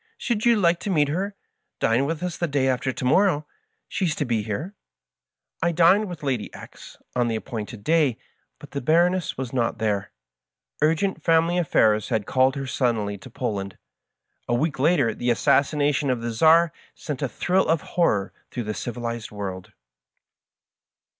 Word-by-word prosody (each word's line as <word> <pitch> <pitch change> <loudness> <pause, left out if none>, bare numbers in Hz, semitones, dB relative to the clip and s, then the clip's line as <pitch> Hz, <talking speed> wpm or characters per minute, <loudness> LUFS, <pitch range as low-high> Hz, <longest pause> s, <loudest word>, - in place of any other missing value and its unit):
Should 235 -2 -1
you 235 - +6
like 175 -4 +2
to 205 - -5
meet 150 -6 +2
her? 195 +6 -2 0.4
Dine 120 +5 +2
with 165 +1 -3
us 180 -1 -2
the 170 - -1
day 140 -3 +1
after 130 0 0
to 125 - -5
morrow. 155 +2 +3 0.4
She 190 - -2
is 160 -3 0
to 145 - -1
be 115 -3 0
here." 110 - -4 0.9
I 170 - +2
dined 180 +4 +4
at 165 -4 -8
Lady 130 -6 -2
X - - -12
^'s - - -35
on 120 -1 +2
the 115 - -1
appointed 110 -1 -6
'day, 155 -7 +2 0.4
but - - -13
the 140 - -3
Baroness 175 +6 +2
was 130 -1 -5
not 120 -3 0
there. 105 -3 -1 0.7
Urgent 165 +3 +1
family 165 +2 +3
affairs 110 -10 +2
had 110 -2 0
called 130 +1 +2
her 135 -1 -4
suddenly 110 -6 -1
to - - -12
Poland. 100 -7 -4 0.7
A 120 - +1
week 145 +2 -1
later 140 -6 +3
the 120 - -2
assassination 145 +5 +2
of 125 -2 0
the 120 0 -3
Czar 160 +7 +4 0.2
sent 145 -4 -6
a 140 - -1
thrill 180 - +1
of 160 -1 +2
horror 105 - +1 0.2
through 120 - -4
the 105 0 -3
civilized 115 +1 -5
world. 95 -3 -6
140 Hz, 175 wpm, -24 LUFS, 115-165 Hz, 0.9 s, you